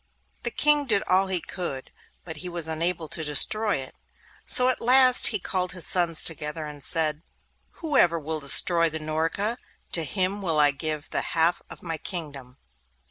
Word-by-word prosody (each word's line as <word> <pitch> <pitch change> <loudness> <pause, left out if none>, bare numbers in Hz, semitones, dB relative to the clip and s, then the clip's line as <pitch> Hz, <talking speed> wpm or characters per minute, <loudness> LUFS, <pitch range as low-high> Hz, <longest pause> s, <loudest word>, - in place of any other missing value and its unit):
The - - -4
King 295 -1 +1
did 205 -4 0
all 190 +1 0
he 190 -2 -1
could, 160 -6 -8 0.3
but 160 -3 -9
he 180 +4 -8
was 170 -2 -3
unable 165 +1 -3
to 160 - -2
destroy 205 +9 +3
it. 130 -1 -7 0.5
So 250 - +5
at 255 - -2
last 255 +1 +6
he 215 - 0
called 185 -1 -4
his 180 -3 0
sons 170 -3 +2
together 155 0 -1
and 145 -2 -9
said, 155 -1 +1 0.5
'Whoever 260 - 0
will 155 +1 -5
destroy 165 +4 +5
the 160 0 -5
Norka, 165 +9 -3 0.3
to 165 - -2
him 190 +5 -3
will 165 -5 -2
I 145 -1 +3
give 155 +2 -6
the - - -2
half 165 +1 -1
of - - -13
my 165 -2 -5
kingdom. 140 -8 -9
165 Hz, 175 wpm, -23 LUFS, 155-190 Hz, 0.5 s, last